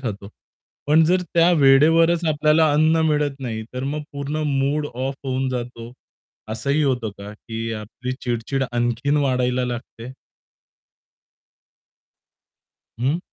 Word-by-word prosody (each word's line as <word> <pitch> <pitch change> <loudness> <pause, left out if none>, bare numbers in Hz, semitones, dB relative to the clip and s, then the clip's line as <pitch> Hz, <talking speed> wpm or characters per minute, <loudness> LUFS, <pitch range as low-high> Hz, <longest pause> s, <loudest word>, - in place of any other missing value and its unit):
खातो. 100 -6 -5 0.6
पण 155 +3 +5
जर 180 +3 +2
त्या 170 +1 +5
वेळेवरच 165 +5 +5
आपल्याला 155 +1 +3
अन्न 155 +2 +3
मिळत 150 -2 +1
नाही, 115 -4 -4
तर 125 - -3
मग 145 +2 -2
पूर्ण 145 +2 -3
मूड 140 +2 0
ऑफ 135 +2 -3
होऊन 130 0 -1
जातो. 120 -2 -5 0.6
असंही 140 +7 0
होतं 125 -6 0
का 100 +1 -8
की 115 +1 -6
आपली 115 +4 -6
चिड-चिड 125 +3 -1
आणखीन 120 +4 0
वाढायला 125 -3 +1
लागते? 120 0 -7 2.9
हं. 135 +7 +1
135 Hz, 115 wpm, -22 LUFS, 120-150 Hz, 2.9 s, पण